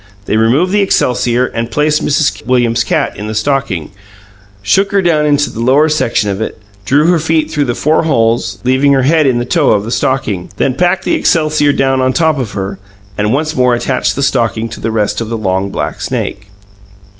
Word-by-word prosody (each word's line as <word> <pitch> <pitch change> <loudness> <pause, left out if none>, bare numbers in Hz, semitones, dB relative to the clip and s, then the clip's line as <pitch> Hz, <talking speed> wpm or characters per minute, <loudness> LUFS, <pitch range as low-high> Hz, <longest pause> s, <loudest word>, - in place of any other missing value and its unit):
They - - -1
removed 125 +12 +2
the 205 +1 +2
excelsior, 125 -8 +1 0.2
placed 150 +4 0
Mrs. 150 0 0
Williams's 120 -2 +2
cat - - -1
in 105 - -6
the 110 - -5
stocking, 110 - -1 0.7
shook 195 - +2
her 200 - +2
down 155 -3 +2
into 145 0 +1
the - - -8
lower 135 +6 +3
section 115 -8 0
of 100 +2 -4
it; 110 - -4 0.3
drew 145 +8 +2
her 175 0 +3
feet 160 0 0
through 145 -1 0
the 120 -2 -2
four 155 +2 +1
holes 115 -6 0
there, 125 - +1
leaving 140 +2 +3
her 135 -1 +2
head 155 +1 +3
in 125 -2 +2
the 120 - -2
toe 150 +1 +1
of 100 - 0
the 115 - -6
stocking; 105 -10 -1
then 130 - +1
packed 180 +6 0
the - - 0
excelsior 155 -2 +2
down 135 -1 +1
on 130 0 +1
top 160 -2 +1
of 120 -6 -4
her, 95 -1 -4 0.4
and 105 +1 -1
once 155 +4 -1
more 125 -1 +3
attached 125 +2 -1
the 140 - -2
stocking 115 -4 0
to 115 - -9
the - - -2
rest 110 0 -1
of 115 - -4
the 115 - -3
long, 95 -2 -1
black - - -4
snake. 100 0 -4
130 Hz, 210 wpm, -13 LUFS, 115-150 Hz, 0.7 s, lower